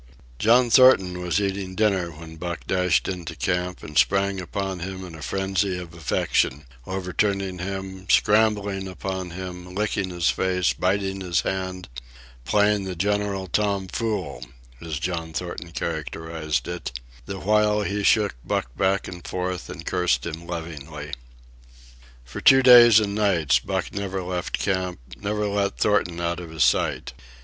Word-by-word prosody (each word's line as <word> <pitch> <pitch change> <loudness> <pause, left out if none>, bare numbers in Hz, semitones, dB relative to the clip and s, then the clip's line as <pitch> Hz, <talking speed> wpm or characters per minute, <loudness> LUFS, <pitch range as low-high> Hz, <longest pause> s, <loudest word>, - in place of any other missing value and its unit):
John 120 +2 +4
Thornton 95 -9 +6
was 90 +2 0
eating 95 -2 -2
dinner 95 -5 +1
when 80 0 -11
Buck 85 +1 -5
dashed 90 -2 +1
into 85 -3 -5
camp 90 +6 -2
and 75 - -9
sprang 100 +2 +2
upon 95 +1 -4
him 95 +1 -6
in 90 - -10
a 80 - -10
frenzy 95 +3 -1
of 85 -2 -8
affection, 75 -3 0 0.2
overturning 95 0 -1
him, 95 0 -5
scrambling 105 -2 +3
upon 95 0 -4
him, 90 0 -8
licking 100 -2 -1
his 85 -2 -1
face, 90 -2 +1
biting 95 +1 -1
his 90 -3 +1
hand—"playing 90 +2 -2
the 95 -1 -4
general 100 +1 -1
tom 100 0 0
fool," 90 - -3 0.4
as 80 -3 -4
John 80 0 -3
Thornton 85 0 -5
characterized 80 -1 -3
it, - - -5 0.3
the 100 -1 -4
while 105 +1 +2
he 100 +1 -2
shook 105 0 +3
Buck - - -2
back 95 0 +1
and 90 -1 -8
forth 90 -1 -3
and 80 - -8
cursed 90 -1 +1
him 85 +1 -6
lovingly. 75 -3 -6 1.1
For - - -7
two 135 0 +7
days 120 -3 +9
and 100 -2 -1
nights 95 -9 +2
Buck - - -3
never 95 -2 -3
left 90 -1 -3
camp, 95 -2 -1 0.2
never 105 - -2
let 100 -1 -1
Thornton 90 -5 +1
out 85 0 -1
of 85 -2 -8
his 80 -1 +1
sight. - - +1
95 Hz, 145 wpm, -24 LUFS, 85-100 Hz, 1.1 s, days